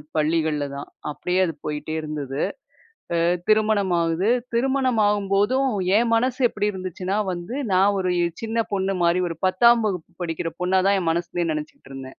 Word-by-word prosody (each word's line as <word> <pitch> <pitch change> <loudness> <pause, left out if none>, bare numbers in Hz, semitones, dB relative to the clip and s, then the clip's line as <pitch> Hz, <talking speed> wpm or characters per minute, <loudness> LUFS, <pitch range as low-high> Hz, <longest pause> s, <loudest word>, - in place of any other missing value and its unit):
பள்ளிகள்ல 155 -1 +1
தான். 140 +1 -6 0.2
அப்டியே 180 +5 -2
அது 165 - -3
போயிட்டே 150 +1 -4
இருந்தது. 150 -3 -4 0.7
அ - - +2 0.3
திருமணம் 215 -3 +3
ஆகுது. 165 +5 0 0.3
திருமணம் 260 -1 +1
ஆகும்போதும் 205 +6 +2 0.3
என் 235 +1 +3
மனசு 250 +2 +1
எப்டி 210 -1 -1
இருந்துச்சுன்னா 185 +1 -4 0.2
வந்து, 175 +7 -6 0.2
நான் 195 +2 +4
ஒரு 185 -1 0 0.3
சின்ன 225 0 -1
பொண்ணு 195 0 0
மாரி, 170 +1 +3
ஒரு 165 - -5
10ம் 235 +5 +5
வகுப்பு 180 -4 -4
படிக்கிற 165 0 -3
பொண்ணா 185 +1 +3
தான் 200 -1 +3
என் 165 -2 0
மனசுலேயே 170 0 -2
நெனைச்சுகிட்டுருந்தேன். 135 -3 -7
185 Hz, 150 wpm, -23 LUFS, 165-215 Hz, 0.7 s, 10ம்